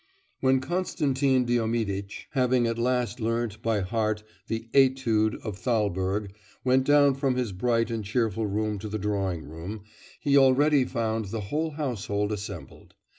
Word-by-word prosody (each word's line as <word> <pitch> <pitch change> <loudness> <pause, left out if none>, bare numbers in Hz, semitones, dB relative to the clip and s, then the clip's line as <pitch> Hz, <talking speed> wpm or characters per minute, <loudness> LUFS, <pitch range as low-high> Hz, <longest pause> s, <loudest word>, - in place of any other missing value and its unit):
When 130 0 +3
Konstantin 140 -6 +1
Diomiditch, 110 -4 -1
having 125 -2 +2
at 115 0 -1
last 125 -2 0
learnt 115 -1 -2
by 110 -3 +1
heart 110 +1 -1 0.2
the 115 0 -3
etude 130 -5 +3
of 105 -4 -5
Thalberg, 100 -3 -1 0.3
went 130 +1 +3
down 145 -1 +5
from 135 -1 0
his 125 -4 -1
bright 115 +4 0
and 115 -2 -2
cheerful 110 0 0
room 105 0 -1
to 105 +2 -6
the 110 - -2
drawing 95 -5 -2
room, 85 +8 -7 0.4
he 140 -1 +2
already 135 +1 +4
found 115 -3 -1
the 110 +3 -4
whole 160 +2 0
household 110 -8 -2
assembled. 100 -3 -7
115 Hz, 145 wpm, -27 LUFS, 105-130 Hz, 0.4 s, down